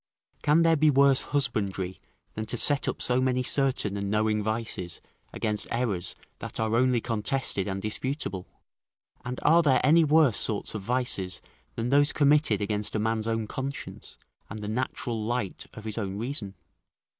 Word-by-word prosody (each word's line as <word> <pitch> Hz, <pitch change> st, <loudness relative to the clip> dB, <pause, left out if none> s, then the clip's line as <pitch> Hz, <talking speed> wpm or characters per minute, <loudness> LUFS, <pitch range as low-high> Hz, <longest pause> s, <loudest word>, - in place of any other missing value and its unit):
Can 155 Hz, +3 st, +4 dB
there 165 Hz, 0 st, +4 dB
be 155 Hz, 0 st, +4 dB
worse 140 Hz, -1 st, +5 dB
husbandry 100 Hz, -9 st, -2 dB, 0.3 s
than 110 Hz, 0 st, -5 dB
to 120 Hz, -, -2 dB
set 145 Hz, +4 st, +2 dB
up -, -, -2 dB
so 125 Hz, +1 st, +2 dB
many 130 Hz, 0 st, +1 dB
certain 130 Hz, -7 st, +2 dB
and 100 Hz, 0 st, -3 dB
knowing 105 Hz, 0 st, +1 dB
vices 110 Hz, -5 st, -3 dB, 0.3 s
against 105 Hz, -2 st, -2 dB
errors 115 Hz, -7 st, -1 dB, 0.2 s
that -, -, -6 dB
are 110 Hz, 0 st, 0 dB
only 125 Hz, 0 st, +3 dB
contested 115 Hz, -2 st, -1 dB
and 95 Hz, -1 st, -3 dB
disputable? 110 Hz, -4 st, -3 dB, 0.8 s
And 125 Hz, +1 st, -5 dB
are 165 Hz, +3 st, +6 dB
there 135 Hz, -5 st, +3 dB
any 160 Hz, +4 st, +6 dB
worse 150 Hz, -6 st, +4 dB
sorts 105 Hz, -2 st, -1 dB
of 110 Hz, -, -4 dB
vices 100 Hz, -5 st, 0 dB, 0.4 s
than 120 Hz, -, -2 dB
those 145 Hz, +2 st, +4 dB
committed 145 Hz, -7 st, +3 dB
against 105 Hz, +1 st, -2 dB
a -, -, +1 dB
man's 110 Hz, 0 st, -1 dB
own 115 Hz, -1 st, -1 dB
conscience, 135 Hz, +5 st, -6 dB, 0.3 s
and 110 Hz, -, -6 dB
the 105 Hz, -1 st, -6 dB
natural 115 Hz, 0 st, -3 dB
light 115 Hz, -3 st, -3 dB
of 110 Hz, -, -9 dB
his 110 Hz, +1 st, -1 dB
own 100 Hz, -2 st, -3 dB
reason? 110 Hz, -4 st, -3 dB
115 Hz, 165 wpm, -27 LUFS, 105-135 Hz, 0.8 s, are